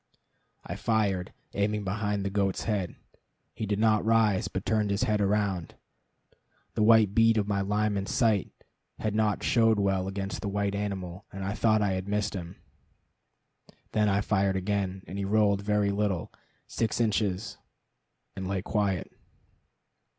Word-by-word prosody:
I - - -5
fired, 100 -5 0 0.2
aiming 105 +1 0
behind 105 0 -2
the 100 - -1
goat's 100 -2 0
head. 100 -5 -2 0.6
He 110 - -4
did 100 0 0
not 110 -1 +3
rise, 110 -3 +3
but 95 - -5
turned 110 -2 +1
his 100 +1 0
head 105 -1 +1
round. 100 -4 0 1.0
The - - -1
white 110 -2 +5
bead 115 +1 +4
of 105 -1 +1
my 100 -1 0
Lyman 105 0 0
sight 110 - +2 0.5
had 110 -1 -2
not 105 -1 +1
showed 115 -2 +3
well 95 -2 +1
against 95 0 -4
the 100 - -3
white 100 0 -1
animal, 100 -2 -4
and 95 0 -5
I 95 - -1
thought 110 -1 +2
I 100 - +1
had 95 +1 -3
missed 105 +1 -1
him. 90 -2 -6 1.4
Then 105 -1 +2
I 100 +1 +2
fired 100 -2 +1
again, 95 -1 -2
and 100 - -6
he - - -1
rolled 100 0 +2
very 105 0 +1
little 100 -5 -1 0.3
six 115 0 -2
inches 105 -2 0 0.8
and 95 -1 -4
lay 95 -1 -2
quiet. 100 -5 -1
100 Hz, 155 wpm, -28 LUFS, 95-105 Hz, 1.4 s, white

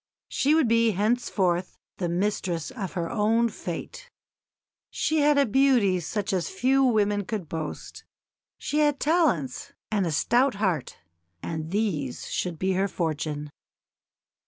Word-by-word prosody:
She 290 +3 +2
would 320 -6 +3
be 230 -1 +3
henceforth 190 -4 0 0.2
the 175 -2 -2
mistress 180 - -1
of 210 -8 -5
her 170 -3 -2
own 225 +4 +2
fate. - - -7 0.8
She 315 0 0
had 285 -5 +3
beauty 245 -8 +4
such 200 +5 -3
as 180 -3 -1
few 260 +7 +2
women 210 -4 +2
could 200 -4 -4
boast 160 -1 -6 0.5
she 300 - -2
had 295 -2 +2
talents 290 - +1 0.2
and 200 -4 +1
a - - -1
stout 240 - +2
heart; 190 - -1 0.5
and 160 -1 -4
these 170 - -2
should 175 -3 -2
be 190 +4 0
her 190 +1 +1
fortune. 150 -4 -3
200 Hz, 135 wpm, -26 LUFS, 170-245 Hz, 0.8 s, beauty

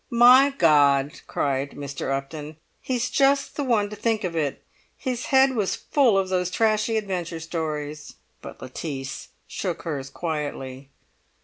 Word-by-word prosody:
"My 250 +4 +7
God!" 145 -3 +4
cried 140 0 -1
Mr. 140 -2 -5
Upton, 150 +3 -5 0.2
"he's 250 -2 -1
just 275 0 +2
the 290 - -2
one 225 -6 +2
to - - -5
think 220 0 0
of 175 -3 -3
it. 150 -4 -2 0.3
His 255 -3 -3
head 265 0 +5
was 210 -6 0
full 255 -9 +2
of 190 -1 0
those 180 -1 0
trashy 215 +3 +1
adventure 180 -5 -3
stories!" 155 -2 -5 0.3
But - - -10
Lettice 135 +1 -6 0.2
shook 175 -4 -4
hers 140 -5 -4
quietly. 140 -4 -5
170 Hz, 140 wpm, -24 LUFS, 145-225 Hz, 0.3 s, My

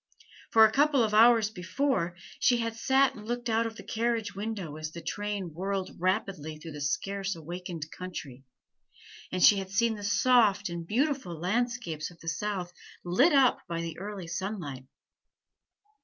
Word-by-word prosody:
For 220 -1 +7
a 215 - +3
couple 280 0 +3
of 215 -1 -1
hours 225 -1 +6
before, 180 -1 -1 0.2
she 245 - +4
had 230 -1 -2
sat 265 +3 +3
and 210 - -11
looked 240 0 -2
out 225 +1 +2
of 225 - -8
the - - -10
carriage 225 -2 -1
window 200 -6 -5
as 155 0 -4
the 170 - -9
train 205 -2 -4
whirled 190 +2 -3
rapidly 185 -4 -1
through 160 +1 -9
the 150 -1 -7
scarcely 195 +5 -2
awakened 170 0 -6
country, 150 -8 -8 0.9
and 185 - 0
she 205 - +8
had 190 -1 -4
seen 225 +3 +2
the 205 -2 -8
soft 205 -2 +3
and 170 -1 -6
beautiful 255 - -1
landscapes 195 -4 -1
of 175 -2 -17
the 165 - -4
South 180 0 -3 0.3
lit 245 - +4
up 270 -3 +4
by 170 -1 -3
the 165 -1 -5
early 200 -2 -6
sunlight. 165 -7 -5
200 Hz, 165 wpm, -29 LUFS, 170-230 Hz, 0.9 s, she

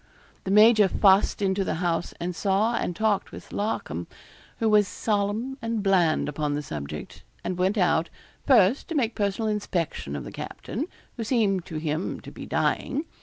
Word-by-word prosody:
The - - -3
major 210 +1 +7
fussed 195 +1 +3
into 195 0 +1
the - - -2
house, 170 0 -1
and 175 +1 -3
saw 200 +5 +1
and 175 - -2
talked 215 0 0
with - - -11
Larcom, 210 +2 -3 0.5
who 225 - 0
was 210 -2 +5
solemn 215 +7 -1
and 225 -2 -2
bland 180 -7 +3
upon 150 0 -2
the 150 - -3
subject, 75 - -7 0.2
and 185 - -2
went 185 +4 +1
out, 170 -3 +2 0.4
first, 235 -1 +4
to 335 - -4
make 235 -6 +1
personal 205 +2 -1
inspection 175 - -2
of 70 - -4
the - - -8
captain, 280 +9 -5 0.3
who 230 - -2
seemed 210 -6 +1
to 160 - -7
him 155 +3 -2
to - - -10
be - - -9
dying. 290 +4 0
195 Hz, 170 wpm, -26 LUFS, 170-220 Hz, 0.5 s, major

